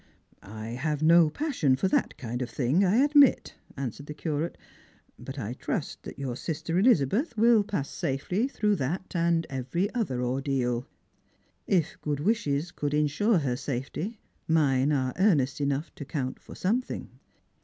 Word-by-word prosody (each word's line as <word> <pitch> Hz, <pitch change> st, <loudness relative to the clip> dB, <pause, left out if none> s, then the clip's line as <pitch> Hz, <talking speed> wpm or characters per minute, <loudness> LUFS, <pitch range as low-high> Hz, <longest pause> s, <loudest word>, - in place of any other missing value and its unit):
" -, -, -37 dB, 0.2 s
I 110 Hz, -, -5 dB
have 150 Hz, +5 st, -2 dB
no 165 Hz, 0 st, +6 dB
passion 170 Hz, -, +1 dB
for 135 Hz, -, 0 dB
that -, -, 0 dB
kind 120 Hz, -2 st, -4 dB
of 125 Hz, -, -3 dB
thing, 135 Hz, -, +1 dB
I 205 Hz, +8 st, +4 dB
admit," 290 Hz, -2 st, +5 dB, 0.2 s
answered 140 Hz, +2 st, -5 dB
the 150 Hz, -, -6 dB
Curate. 155 Hz, +1 st, -3 dB, 0.3 s
" -, -, -34 dB
But -, -, -6 dB
I -, -, -3 dB
trust -, -, -4 dB
that -, -, -9 dB
your 130 Hz, -3 st, -3 dB
sister 160 Hz, +5 st, -2 dB
Elizabeth 230 Hz, -, +3 dB
wiU 225 Hz, -2 st, +4 dB
pass 145 Hz, -10 st, -2 dB
safely 180 Hz, -, -1 dB
through 210 Hz, -6 st, 0 dB
that 175 Hz, +8 st, -3 dB
and 170 Hz, -1 st, +2 dB
every 135 Hz, -, -2 dB
other 135 Hz, -, -1 dB
ordeal. 125 Hz, -1 st, -1 dB, 0.8 s
If 175 Hz, -5 st, 0 dB
good 145 Hz, -1 st, -2 dB
wishes 170 Hz, -5 st, 0 dB
could 145 Hz, 0 st, -2 dB
insure 150 Hz, +9 st, +2 dB
her 135 Hz, -6 st, 0 dB
safety, 140 Hz, -, -4 dB, 0.3 s
mine 145 Hz, -3 st, +3 dB
are 130 Hz, -3 st, 0 dB
earnest 145 Hz, -9 st, +3 dB
enough 140 Hz, +2 st, -1 dB
to -, -, -8 dB
count 135 Hz, -2 st, -4 dB
for -, -, -12 dB
something." 235 Hz, +7 st, -2 dB
150 Hz, 160 wpm, -28 LUFS, 135-190 Hz, 0.8 s, no